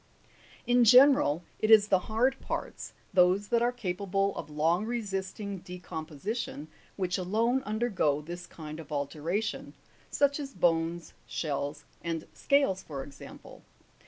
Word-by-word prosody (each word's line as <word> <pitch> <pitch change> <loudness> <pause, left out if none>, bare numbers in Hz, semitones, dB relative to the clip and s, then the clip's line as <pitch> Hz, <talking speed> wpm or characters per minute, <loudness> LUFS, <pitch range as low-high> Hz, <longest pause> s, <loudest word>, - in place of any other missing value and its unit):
2. 240 - +1
Tn 245 - +6
general, 250 - +6 0.2
it 215 - 0
is 215 -1 +7
the 190 - +4
hard 245 +5 +2
parts, - - -5 0.2
those 185 +2 +4
that 235 -1 +2
are 240 +1 +2
capable 195 -3 -1
of - - -6
long 160 +6 +1
resisting 200 -3 -4
decomposition, 175 - -6 0.3
which 185 -1 -1
alone 225 +8 +1
undergo 210 -10 +1
this 175 +3 -8
kind 155 -1 -9
of 155 -2 -11
altera 150 +6 -1
tion; 220 0 -5 0.3
such 285 +1 +2
as 275 -2 -6
bones, 165 0 0
shells, 145 -1 -3 0.2
and 165 -2 -3
scales, 275 -10 +2
for 140 -3 -6
example. 140 0 -12
190 Hz, 135 wpm, -29 LUFS, 165-225 Hz, 0.3 s, is